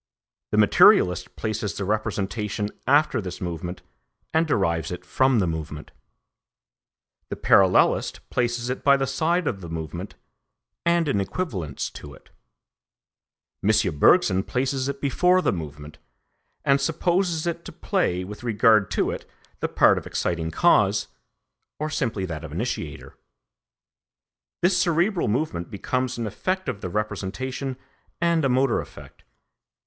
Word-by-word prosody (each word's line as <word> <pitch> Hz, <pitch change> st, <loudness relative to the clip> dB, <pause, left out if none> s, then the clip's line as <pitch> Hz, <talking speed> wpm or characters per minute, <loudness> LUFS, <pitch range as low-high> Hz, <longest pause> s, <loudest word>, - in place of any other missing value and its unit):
The -, -, -1 dB
materialist 90 Hz, -1 st, +5 dB
places 110 Hz, -4 st, -3 dB
the 100 Hz, -, -2 dB
representation 105 Hz, 0 st, -2 dB, 0.2 s
after 145 Hz, -3 st, +3 dB
this 90 Hz, -2 st, -6 dB
movement 85 Hz, 0 st, -5 dB, 0.5 s
and 160 Hz, +1 st, +2 dB
derives 85 Hz, -, 0 dB
it 90 Hz, 0 st, -6 dB
from 130 Hz, +7 st, +2 dB
the 100 Hz, -, +2 dB
movement; 80 Hz, -2 st, -5 dB, 1.4 s
the -, -, -3 dB
parallelist 95 Hz, -2 st, +3 dB
places 120 Hz, 0 st, -1 dB
it 130 Hz, -, -5 dB
by 140 Hz, -1 st, +5 dB
the 135 Hz, -, 0 dB
side 165 Hz, +7 st, 0 dB
of 100 Hz, -4 st, -2 dB
the 85 Hz, -, -8 dB
movement 80 Hz, -2 st, -6 dB, 0.7 s
and 170 Hz, -1 st, +3 dB
in 100 Hz, -8 st, +1 dB
equivalence 95 Hz, -, -3 dB
to 70 Hz, -1 st, -10 dB
it. -, -, -21 dB, 1.3 s
M. 100 Hz, -5 st, +2 dB
Bergson 95 Hz, +5 st, +5 dB
places 130 Hz, +4 st, -1 dB
it 140 Hz, 0 st, -5 dB
before 180 Hz, +7 st, +3 dB
the 185 Hz, -, +1 dB
movement, 75 Hz, -3 st, -8 dB, 0.7 s
and 140 Hz, 0 st, +3 dB
supposes 170 Hz, +2 st, 0 dB
it 170 Hz, 0 st, -3 dB
to -, -, -7 dB
play 90 Hz, +1 st, -1 dB
with 105 Hz, +3 st, -9 dB
regard 110 Hz, -3 st, +4 dB
to -, -, 0 dB
it -, -, -7 dB, 0.3 s
the -, -, -1 dB
part -, -, +4 dB
of -, -, -11 dB
exciting 85 Hz, -2 st, -2 dB
cause, -, -, +3 dB, 0.7 s
or 155 Hz, +1 st, -3 dB
simply 110 Hz, -10 st, -1 dB
that 80 Hz, -3 st, -6 dB
of 80 Hz, -, -8 dB
initiator. -, -, -5 dB, 1.5 s
This 180 Hz, +1 st, +4 dB
cerebral 175 Hz, +3 st, +1 dB
movement 105 Hz, -, -2 dB
becomes 125 Hz, +5 st, -2 dB
an 115 Hz, -, -2 dB
effect 185 Hz, -, -2 dB
of 120 Hz, -6 st, -4 dB
the 90 Hz, -, -4 dB
representation 125 Hz, +6 st, -3 dB, 0.4 s
and 170 Hz, -1 st, +2 dB
a 135 Hz, -, +2 dB
motor 130 Hz, -1 st, +2 dB
effect. -, -, -14 dB
115 Hz, 135 wpm, -24 LUFS, 90-140 Hz, 1.5 s, materialist